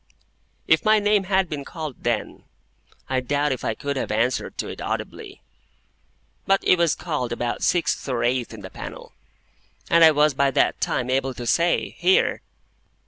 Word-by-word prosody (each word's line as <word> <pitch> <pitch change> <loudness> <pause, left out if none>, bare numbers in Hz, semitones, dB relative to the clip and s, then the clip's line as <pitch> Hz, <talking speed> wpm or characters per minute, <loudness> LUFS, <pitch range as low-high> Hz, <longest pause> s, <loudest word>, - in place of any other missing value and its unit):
If 160 - +4
my 215 0 +5
name 205 -1 +2
had 190 -1 +1
been 145 -3 -5
called 155 -2 -7
then, 120 -3 -2 0.6
I 130 0 0
doubt 145 +3 0
if 130 - -3
I 110 - -1
could 140 +2 -4
have - - -3
answered 115 +4 -1
to - - -3
it - - -8
audibly. - - -5 1.0
But 195 0 +3
it 180 - +4
was 170 -2 +3
called 150 -8 -3
about 120 0 -3
sixth 170 -5 0
or 120 -2 -1
eighth 120 0 0
in - - -10
the - - -9
panel, - - -9 0.8
and 170 0 +6
I 160 - +10
was 150 -1 +3
by 140 +1 +2
that 135 - +1
time 125 0 -1
able 135 0 0
to 120 +1 -6
say, 170 +8 +1
"Here!" 185 +2 +3
140 Hz, 175 wpm, -23 LUFS, 125-170 Hz, 1.0 s, I